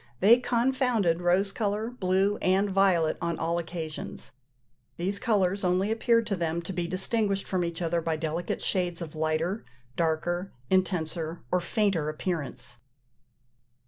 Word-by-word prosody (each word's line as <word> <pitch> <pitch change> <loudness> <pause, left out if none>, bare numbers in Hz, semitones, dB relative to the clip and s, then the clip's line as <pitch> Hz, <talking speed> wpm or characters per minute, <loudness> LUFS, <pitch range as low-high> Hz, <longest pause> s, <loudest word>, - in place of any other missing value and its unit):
They 230 +5 +7
confounded 245 -7 +1
rose 185 +3 +2
colour, 215 +2 -1
blue, 195 -2 +1
and 195 +2 +2
violet 185 -5 +3
on 170 -1 -1
all 170 +1 0
occasions: 160 -2 -6 0.7
these 195 +4 -1
colours 200 -4 +1
only 185 +3 +2
appeared 230 0 +2
to 200 - -1
them 170 -1 -2
to 190 - -5
be 175 -1 -2
distinguished 195 +2 0
from 185 -2 0
each 170 +1 -3
other 170 0 0
by 160 0 -1
delicate 165 +2 -3
shades 180 -3 0
of 155 - -8
lighter, 160 +6 -1 0.3
darker, 175 +3 -1 0.2
intenser, 170 -3 0
or 180 - +2
fainter 175 -4 0
appearance. 150 -7 -4
180 Hz, 140 wpm, -28 LUFS, 165-200 Hz, 0.7 s, They